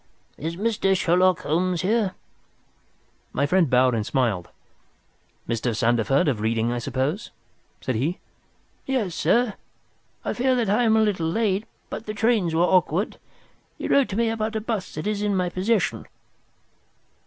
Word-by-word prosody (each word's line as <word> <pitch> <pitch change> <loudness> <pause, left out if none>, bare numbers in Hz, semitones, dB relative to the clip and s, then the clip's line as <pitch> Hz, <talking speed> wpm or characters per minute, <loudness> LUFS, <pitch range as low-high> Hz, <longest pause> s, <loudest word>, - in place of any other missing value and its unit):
"Is 165 +2 -4
Mr. 195 -1 +1
Sherlock 180 +1 +3
Holmes 175 +3 0
here?" 205 -1 +1 1.2
My 140 - +1
friend 170 0 +3
bowed 125 0 +4
and 110 -2 0
smiled. 110 -7 -1 1.0
"Mr. 115 0 -1
Sandeford, 120 +6 +2
of 130 -7 +1
Reading, 115 +1 0
I 120 - -1
suppose?" 135 - -2 0.5
said 130 - -2
he. 145 +11 -1 0.7
"Yes, 240 -10 0
sir, 235 +3 +2 0.7
I - - -1
fear 260 +1 +2
that 230 -5 +1
I 240 +4 +3
am 220 -1 +4
a 220 - +4
little 185 -6 0
late, 210 +2 0 0.2
but 220 - -6
the 215 - -4
trains 210 -7 +1
were 165 - +3
awkward. 180 +2 +1 0.6
You - - -4
wrote 280 -2 +4
to 195 - -4
me 230 -1 +2
about 220 0 -2
a 220 - -1
bust 215 -4 -4
that 155 - -4
is 210 -1 -1
in 205 -1 0
my 180 -1 0
possession." 190 +2 0
185 Hz, 155 wpm, -24 LUFS, 140-220 Hz, 1.2 s, bowed